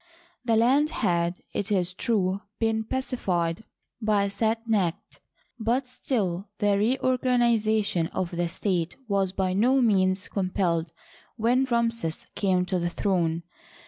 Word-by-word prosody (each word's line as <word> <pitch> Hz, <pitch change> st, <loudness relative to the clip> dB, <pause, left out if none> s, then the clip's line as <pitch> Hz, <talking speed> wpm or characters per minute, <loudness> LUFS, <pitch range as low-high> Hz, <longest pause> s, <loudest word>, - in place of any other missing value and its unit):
The 230 Hz, -2 st, +2 dB
land 265 Hz, +7 st, +4 dB
had, 175 Hz, -, 0 dB
it 205 Hz, +1 st, -2 dB
is 180 Hz, -3 st, +1 dB
true, 195 Hz, -3 st, 0 dB, 0.2 s
been 225 Hz, -1 st, 0 dB
pacified 195 Hz, -8 st, -2 dB, 0.4 s
by 205 Hz, -2 st, +2 dB
Set 225 Hz, +3 st, -1 dB
necht, 190 Hz, -7 st, -1 dB, 0.4 s
but 240 Hz, +4 st, 0 dB
still 205 Hz, -7 st, -2 dB
the 205 Hz, -2 st, +2 dB
reorganiza 235 Hz, -1 st, +2 dB
tion 170 Hz, -4 st, 0 dB
of 180 Hz, 0 st, -3 dB
the 175 Hz, 0 st, -1 dB
state 175 Hz, -2 st, -1 dB
was 195 Hz, -3 st, +1 dB
by 185 Hz, -1 st, -1 dB
no 250 Hz, +8 st, +3 dB
means 190 Hz, -5 st, +2 dB
completed 180 Hz, -4 st, -1 dB, 0.5 s
when 245 Hz, +4 st, +2 dB
Ramses 230 Hz, -8 st, -1 dB
came 185 Hz, -3 st, +1 dB
to 185 Hz, 0 st, -1 dB
the 175 Hz, 0 st, -1 dB
throne. 170 Hz, -3 st, 0 dB
200 Hz, 130 wpm, -26 LUFS, 180-230 Hz, 0.5 s, land